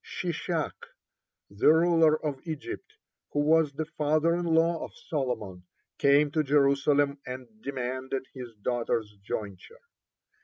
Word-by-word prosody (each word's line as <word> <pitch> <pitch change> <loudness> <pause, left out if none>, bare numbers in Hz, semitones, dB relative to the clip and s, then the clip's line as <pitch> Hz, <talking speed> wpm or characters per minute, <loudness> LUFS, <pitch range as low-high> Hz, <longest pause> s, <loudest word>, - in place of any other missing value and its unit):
Shishak, 170 -2 -3 0.8
(13) 100 - -18
the - - +7
ruler 160 -2 +4
of 140 -3 -3
Egypt, 155 -3 -6 0.4
who 145 - +2
was 155 0 +4
the 155 +3 -3
father 155 +1 +1
in 175 0 -2
law 165 0 +2
of - - -9
Solomon, 125 - -3 0.4
came 145 +1 +4
to 155 - +2
Jerusalem 140 0 +3
and 130 0 -6
demanded 130 0 -3
his 125 -4 -9
daughter's 115 0 -1
jointure. 105 - -6
145 Hz, 125 wpm, -28 LUFS, 130-160 Hz, 0.8 s, the